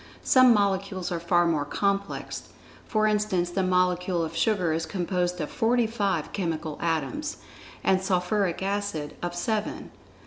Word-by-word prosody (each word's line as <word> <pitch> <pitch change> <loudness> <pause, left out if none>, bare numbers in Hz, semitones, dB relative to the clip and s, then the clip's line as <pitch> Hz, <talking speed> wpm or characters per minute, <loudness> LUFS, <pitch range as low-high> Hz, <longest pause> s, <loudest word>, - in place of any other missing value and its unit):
Some 255 -1 +6
molecules 195 -3 +1
are 170 - -1
far 175 +1 +3
more 160 -4 +1
complex, 200 +6 -2 0.4
for 215 -1 +2
instance 210 -5 +1
the 190 - 0
molecule 180 -1 +1
of 160 +1 -7
sugar 180 -2 +1
is 165 +1 -2
composed 180 -1 -1
of 150 - -3
forty 235 +1 +2
five 200 -8 -1
chemical 160 -5 -3
atoms, 165 - -2 0.5
and 190 -1 +3
sulphuric 190 0 0
acid 195 -7 -2
of 175 0 -3
seven. 215 +4 -2
185 Hz, 140 wpm, -26 LUFS, 170-205 Hz, 0.5 s, Some